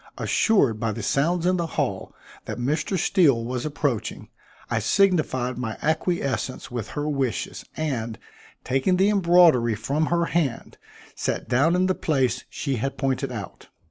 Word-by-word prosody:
Assured 140 - +2
by 115 0 0
the 115 - -6
sounds 165 +8 +1
in 185 0 +3
the 170 -1 -1
hall - - -2 0.3
that - - -5
Mr. 150 +9 -1
Steele 140 -9 +3
was 125 +3 -3
approaching, 145 -6 -3 0.4
I - - 0
signified 150 -11 +1
my 115 -3 -4
acquiescence 155 -5 -1
with 120 -4 -4
her 145 +1 -1
wishes, 135 -6 -2
and, 120 -8 -2 0.5
taking 135 +8 +1
the 195 +2 +4
embroidery 170 - +5
from 140 +9 -1
her 170 0 +1
hand, 155 -8 -2 0.3
sat - - -3
down 140 +8 +3
in 185 +1 +2
the 185 - +2
place 130 -8 0
she 135 -4 -3
had 135 +5 -3
pointed 135 -2 -1
out. - - -8
140 Hz, 150 wpm, -24 LUFS, 125-170 Hz, 0.5 s, embroidery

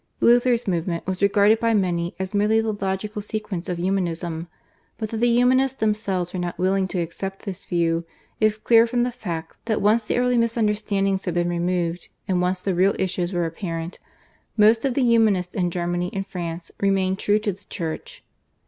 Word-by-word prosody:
Luther's 240 0 +4
movement 170 -2 -1
was 190 0 -3
regarded 205 +2 +4
by 230 -1 +2
many 175 -3 0
as 190 +1 -4
merely 210 +2 +3
the 225 0 0
logical 205 +1 -3
sequence 205 -4 -4
of 180 - -2
Humanism, 170 -2 -2 0.5
but 220 -2 -4
that 225 - -3
the 240 +2 +3
Humanists 255 +2 +3
themselves 200 -5 -1
were 185 - -3
not 175 -1 -3
willing 190 +1 +1
to 185 - -3
accept 190 +3 -5
this 190 -3 -7
view 170 -1 +1 0.4
is 215 0 +3
clear 230 +1 +5
from 240 +1 +1
the 250 - -1
fact 170 -9 -6
that 220 -2 0
once 215 +3 +3
the 215 - -2
early 250 -1 +2
misunderstandings 210 -4 0
had 175 -3 -2
been 175 0 +1
removed, 175 0 -1 0.2
and 180 -2 +1
once 180 0 0
the 190 0 -1
real 185 +3 +3
issues 180 -1 -1
were 175 -2 0
apparent, 165 0 -5 0.6
most 220 +3 +5
of 260 -3 0
the 275 - +2
Humanists 215 -6 +3
in 180 -3 0
Germany 175 0 -2
and 195 0 -3
France 170 -3 -6
remained 195 -1 +1
true 205 0 +2
to 210 -2 -1
the 195 +2 -19
Church. 160 -2 -6
195 Hz, 185 wpm, -23 LUFS, 175-215 Hz, 0.6 s, clear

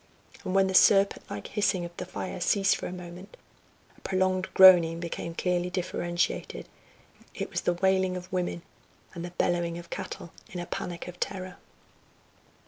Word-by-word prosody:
And 185 - -3
when 195 0 +5
the 190 - -2
serpent 195 +1 +4
like 100 - -6
hissing 195 -4 0
of 170 0 -10
the 180 - -5
fire 185 - -5
ceased 195 +2 +3
for - - -5
a - - -6
moment, 180 +2 -10 0.6
a - - -23
prolonged 185 0 0
groaning 175 -3 +8
became 170 0 -5
clearly 180 0 0
differentiated: 175 -1 -2 0.7
it - - -4
was - - -2
the 175 - +1
wailing 190 0 +1
of 180 +1 -10
women, 175 -2 -2 0.5
and 170 -2 -6
the 175 - -5
bellowing 170 -1 0
of 170 0 -11
cattle 170 - -6 0.2
in 180 - -6
a 175 - -4
panic 175 0 -5
of 180 0 -10
terror. 185 -2 -4
180 Hz, 165 wpm, -28 LUFS, 175-185 Hz, 0.7 s, groaning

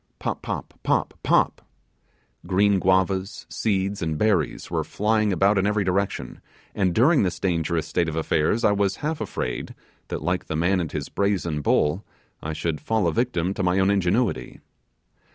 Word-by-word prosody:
Pop, - - -3
Pop, - - -5
Pop, - - 0
Pop! - - +2 0.9
green 100 +2 +3
guavas, 95 +1 +1
seeds, 100 -2 -1
and 80 -2 -1
berries 95 -9 0
were - - 0
flying 110 0 +1
about 95 +3 +3
in 95 - +1
every 105 0 +1
direction, 95 +1 -2 0.3
and 95 -4 0
during 140 +7 +5
this 90 -4 -1
dangerous 85 -3 0
state 85 +1 0
of 80 - -5
affairs 80 +7 +1
I 105 - +5
was 100 -1 +1
half 160 0 -2
afraid 60 - -4 0.3
that, - - -5
like 90 +2 -1
the 80 - -4
man 90 +4 +2
and 85 -4 -3
his 75 -2 -4
brazen 90 -7 -1
bull, 75 +6 +1 0.4
I 80 - -4
should 80 0 -3
fall 110 -2 0
a - - +1
victim 95 -7 0
to 100 - -4
my 90 0 +2
own 95 +1 +3
ingenuity. 100 +4 0
95 Hz, 170 wpm, -24 LUFS, 85-100 Hz, 0.9 s, during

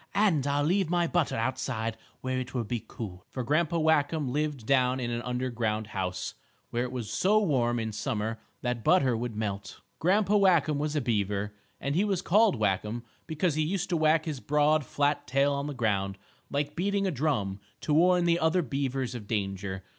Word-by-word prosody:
"And 180 -10 +3
I'll 145 +1 +1
leave 180 +3 +2
my 175 0 +2
butter 170 -2 +1
outside 115 -1 -2 0.3
where 130 0 -1
it 130 +1 -6
will 120 - 0
be 115 +1 -3
cool," 95 -6 -7
for 130 - -4
Grandpa 155 +6 +1
Whackum 155 -3 +2
lived 150 -5 -2
down 130 0 +3
in 120 -1 -2
an 120 0 -2
underground 120 -3 -2
house, 90 -2 -3 0.4
where 120 - 0
it 125 - -4
was 120 -5 -4
so 205 - +3
warm, 125 - +1
in 110 -1 -2
summer, 110 +1 -2 0.2
that 125 -2 -2
butter 135 - +4
would 115 -1 -3
melt. 100 -2 -4 0.2
Grandpa 200 +4 +3
Whackum 170 -7 +3
was 150 +1 -1
a 150 - +1
beaver, 105 -3 -1 0.3
and 140 - -2
he 180 +6 +3
was 195 -3 0
called 210 +1 +4
Whackum 105 +2 -1 0.2
because 160 +1 0
he 155 - 0
used 185 +4 -1
to 175 - +1
whack 155 0 +3
his 150 -5 -3
broad, 150 +2 +2
flat 145 0 0
tail 140 +3 +2
on 140 +1 -2
the 145 - -5
ground, 100 -5 0 0.3
like 145 +1 -2
beating 200 +2 0
a 190 - +1
drum, 120 - -1 0.2
to 150 - 0
warn 175 +2 +4
the 170 0 +3
other 165 +2 +2
beavers 135 -2 -2
of 115 -4 -7
danger. 95 -3 -3
135 Hz, 190 wpm, -28 LUFS, 115-160 Hz, 0.4 s, butter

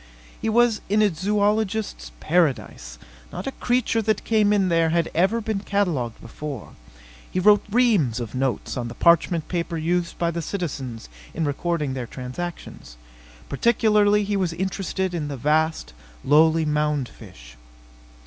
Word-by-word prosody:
He 225 - -1
was 235 -1 +3
in 210 +1 +3
a 205 -4 +2
zoologist's 205 - -1
paradise. 135 - 0 0.3
Not - - -6
a 270 - -2
creature 245 -3 0
that 220 0 0
came 215 -2 +2
in 200 -2 +3
there 165 -1 +2
had 165 0 0
ever 190 +7 +2
been 215 -2 -2
catalogued 175 - -1
before. 135 +1 -7 0.6
He 185 - -2
wrote 205 +2 +5
reams 205 - +2
of 115 -3 -6
notes 130 -1 -2
on 120 -1 -3
the 115 - -8
parchment 170 0 +3
paper 170 -1 -2
used 170 +2 -1
by 170 -1 0
the 170 0 -3
citizens 140 - -5 0.3
in 160 - -1
recording 150 -1 -1
their 125 -2 -4
transactions. 125 - -7 0.5
Particularly 210 - +2
was 190 -3 +1
he 165 - -7
interested 190 0 -2
in 160 -4 -3
the 140 -2 -5
vast, 150 - 0 0.3
lowly 160 +2 +4
mound 150 -3 0
fish. - - -14
170 Hz, 150 wpm, -23 LUFS, 145-205 Hz, 0.6 s, wrote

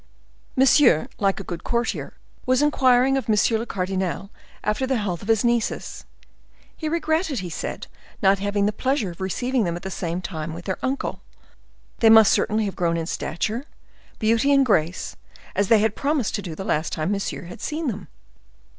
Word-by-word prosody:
Monsieur, 265 - +5
like 195 -1 +1
a - - -5
good 175 -2 -6
courtier, 235 0 -2 0.3
was 255 +2 +3
inquiring 265 -2 +4
of 265 - -4
monsieur 220 +1 +3
le 230 - -5
cardinal 190 +1 -2 0.3
after 215 +5 0
the 260 -1 +1
health 190 -6 -2
of 200 - -9
his 225 +1 +2
nieces; 235 -2 -1 0.7
he 315 - -3
regretted, 315 - 0
he 175 -2 -6
said, - - -5 0.3
not 195 0 +3
having 205 0 0
the 210 - +2
pleasure 255 -4 0
of 170 - -12
receiving 245 +6 0
them 170 -3 -1
at 175 - -8
the 190 - -5
same 175 -1 -3
time 165 -3 -5
with 175 - -9
their 190 - -3
uncle; 265 +1 -2 0.8
they 225 - +6
must 220 -2 +8
certainly 215 0 +1
have 195 - -4
grown 170 -1 0
in 165 - -2
stature, 215 - -3 0.5
beauty 230 +5 +2
and 275 -1 +5
grace, 175 -6 0 0.4
as 200 0 +2
they 225 - +6
had 215 0 +1
promised 280 -5 0
to 205 - -2
do 170 -5 -6
the 190 - -6
last 155 +2 0
time 155 +4 -1
Monsieur 200 -2 -3
had 175 +3 -10
seen 310 +2 -3
them. 235 -8 -3
210 Hz, 185 wpm, -23 LUFS, 185-255 Hz, 0.8 s, must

